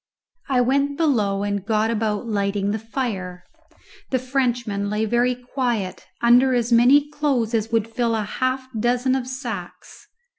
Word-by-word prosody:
I 255 -2 +3
went 280 +3 +1
below 210 -11 +1
and 205 -1 -2
got 220 +1 +1
about 215 -1 -1
lighting 200 -2 -1
the 220 - -2
fire. 200 -6 -4 0.7
The 260 - +1
Frenchman 245 -6 -1
lay 210 +1 0
very 240 +3 +1
quiet, 240 -6 -3
under 245 +2 +5
as 240 0 0
many 265 +5 +5
clothes 265 -7 0
as 225 0 0
would 225 -1 +1
fill 230 0 -1
a 220 - -1
half 255 +5 -2
dozen 245 +3 +1
of 260 -2 -1
sacks. 255 -2 -7
235 Hz, 150 wpm, -22 LUFS, 210-255 Hz, 0.7 s, under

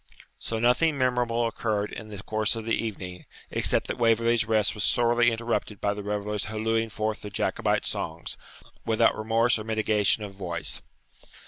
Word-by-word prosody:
So 115 - -3
nothing 125 +7 +3
memorable 120 -2 +1
occurred 110 -2 -1
in 110 - -7
the 105 -1 -8
course 110 +1 0
of 115 -1 -5
the 115 - 0
evening, 90 -5 -4 0.2
except - - +2
that - - -4
Waverley's 115 0 +3
rest 110 -2 +2
was 105 -3 -3
sorely 120 -1 +4
interrupted 115 -3 -2
by 100 - +1
the 105 - -6
revellers 105 0 -2
hallooing 115 +1 0
forth 110 -1 -2
their 105 - -6
Jacobite 100 - 0
songs, 80 +1 -3 0.5
without 115 0 +3
remorse 115 +2 +2
or - - -5
mitigation 110 -1 +1
of 100 -1 -7
voice. 90 -3 -4
110 Hz, 160 wpm, -27 LUFS, 105-115 Hz, 0.5 s, sorely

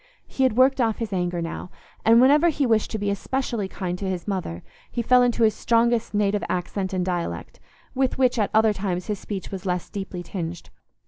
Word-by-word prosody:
He - - -5
had 255 -4 +3
worked 260 +1 +4
off 225 -2 +1
his 225 -4 -4
anger 175 -2 -1
now, 165 +2 -6 0.3
and 230 +1 +6
whenever 290 +6 +5
he 290 -3 0
wished 225 -3 +2
to 220 - -3
be 205 -1 -1
especially 230 0 -2
kind 180 -2 -4
to 195 - -2
his 185 0 -4
mother, 180 - -3 0.3
he 240 - -2
fell 250 +2 +5
into 240 -1 +2
his 215 -1 +4
strongest 235 -1 +1
native 205 0 +1
accent 185 +2 -2
and 185 -2 -1
dialect, 175 -2 -4 0.3
with 265 -1 0
which 255 -2 +2
at 210 - +1
other 220 0 +4
times 185 -3 -3
his 210 -2 -3
speech 195 -3 -6
was 190 -2 -6
less 180 -2 -2
deeply 190 -3 -5
tinged. 170 -1 -6
205 Hz, 205 wpm, -24 LUFS, 185-235 Hz, 0.3 s, and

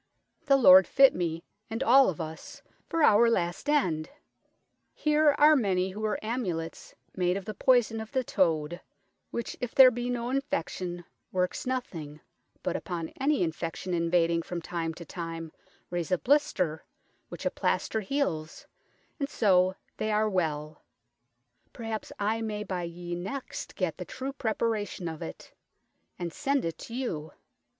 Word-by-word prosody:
The 275 -1 +6
Lord 190 -7 +8
fitt 275 -1 +6
mee 165 -2 -2 0.3
and 225 +4 -2
all 265 0 +6
of 170 - -5
us 160 -1 -7 0.3
for 330 -1 +1
our 230 -1 +6
last 175 +5 -1
end 170 - +1
1 - - -24 0.8
Here 300 -1 +3
are 305 +1 +7
many 190 -7 +1
who 210 +3 -7
weare 215 -1 0
amulets 180 -9 -4 0.2
made 180 0 +1
of 195 - -6
the 215 - -4
poison 235 -1 +3
of 220 - -9
the 260 -2 0
toad, 170 -5 0 0.5
which 235 - -4
if 245 -1 -4
there 260 -2 +9
be 245 +1 -3
no 245 0 -2
infection 180 - -3 0.3
workes 180 +5 -1
nothing, 165 - -4 0.4
but 180 - -1
upon 170 -3 -4
any 280 -6 +2
infection 165 +2 -3
invadeing 170 0 +2
from 175 0 -4
time 165 -1 -4
to 170 - -9
time, 165 -1 -6 0.4
raise 175 -1 -3
a 185 - +4
blister, 180 - +1 0.5
which - - -8
a - - +2
plaister 220 - 0
heales, 185 - -2 0.5
and 280 -1 -1
so 185 -7 +3 0.2
they 215 - -1
are 215 +1 +2
well: 155 -6 -2 0.9
perhaps 225 -2 -5
I 215 +2 0
may 210 -1 -3
by 180 -4 -3
ye 175 +1 -6
next 195 +10 -5
get - - -2
the - - -4
true 270 +1 -5
prepara 220 -4 -1
tion 180 - -6
of 160 -1 -6
it, 80 - -8 0.6
and 170 -2 -4
sent 275 -4 0
it 165 - -4
to 230 - -8
you. 160 - -4
190 Hz, 160 wpm, -28 LUFS, 170-245 Hz, 0.9 s, there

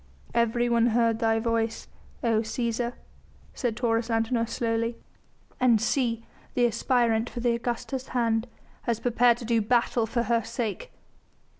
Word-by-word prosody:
"Everyone 235 0 +2
heard 230 -1 +2
thy 225 -1 +2
voice, 225 0 -1 0.4
O 225 -2 +3
Cæsar!" 235 +1 -2 0.6
said 235 -4 -2
Taurus 230 -1 0
Antinor 230 +1 +1
slowly, 230 0 -1 0.6
"and 240 -3 +4
see 230 0 0 0.3
the 245 - +4
aspirant 235 0 +1
for - - -6
the 240 -1 +2
Augusta's 245 +2 -3
hand 230 -2 0 0.4
has 230 -1 +1
prepared 240 0 +3
to 240 - -8
do 230 -1 +2
battle 235 +1 +1
for 235 +1 0
her 235 -1 +1
sake!" 235 - -4
235 Hz, 135 wpm, -27 LUFS, 225-240 Hz, 0.6 s, and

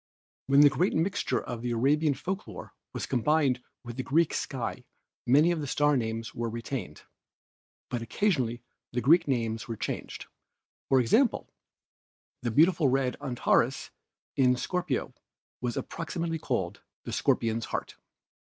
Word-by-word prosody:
"When 140 +1 +6
the 145 - +8
great 180 +7 +1
mixture 195 +5 0
of 120 -1 -6
Arabian 140 +5 +2
folk 185 +8 -4
lore - - -9 0.2
was - - -4
combined 135 0 +2 0.2
with 120 0 -8
the - - 0
Greek 160 +5 +2
sky 130 -4 -3 0.4
many 150 +7 +5
of 170 -3 -1
the 145 - -4
star 145 +2 +2
names 115 -2 -2
were 120 0 -2
retained, 115 - -5 0.8
but 120 - -3
occasionally 125 - 0 0.3
the 125 - 0
Greek 165 +7 +5
names 115 -4 -1
were 115 - -4
changed; - - -5 0.6
for 135 - +5
instance, 225 - +2 0.9
the 120 - -1
beautiful 160 +5 +4
red 130 -1 +1
Antares 130 -1 +1 0.4
in 125 -2 +4
Scor 180 +7 -2
pio - - -2 0.5
was 120 -1 -2
approximately 165 0 -3
called 100 -9 -2 0.2
the - - -6
Scorpion's 115 0 +1
Heart. - - -4
130 Hz, 140 wpm, -28 LUFS, 120-155 Hz, 0.9 s, the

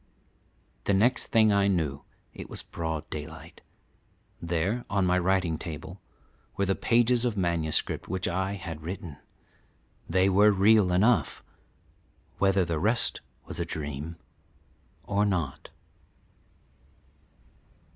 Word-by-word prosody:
The 100 - +2
next 115 +6 +2
thing 110 -2 +4
I 100 0 +3
knew 80 -8 0 0.3
it - - -9
was - - -4
broad 80 -2 -4
daylight. 80 +1 -8 0.8
There, 85 +8 -1
on 100 -2 +1
my 90 0 +3
writing 90 -3 +1
table, 80 -4 -7 0.6
were 100 - +1
the 95 - +1
pages 120 +3 +2
of 120 -4 -1
manuscript 85 -4 0
which 95 +1 -2
I 95 +2 -1
had 80 -5 -7
written. 85 -2 -7 0.9
They 95 +3 +3
were 100 +2 +5
real 100 -1 +4
enough, 110 +7 +2 1.0
whether 95 -1 +3
the 85 -2 -2
rest 110 +7 +1 0.2
was - - -6
a - - +1
dream 75 +1 -5 0.9
or 100 0 0
not. 90 -9 -2
95 Hz, 115 wpm, -27 LUFS, 80-100 Hz, 1.0 s, were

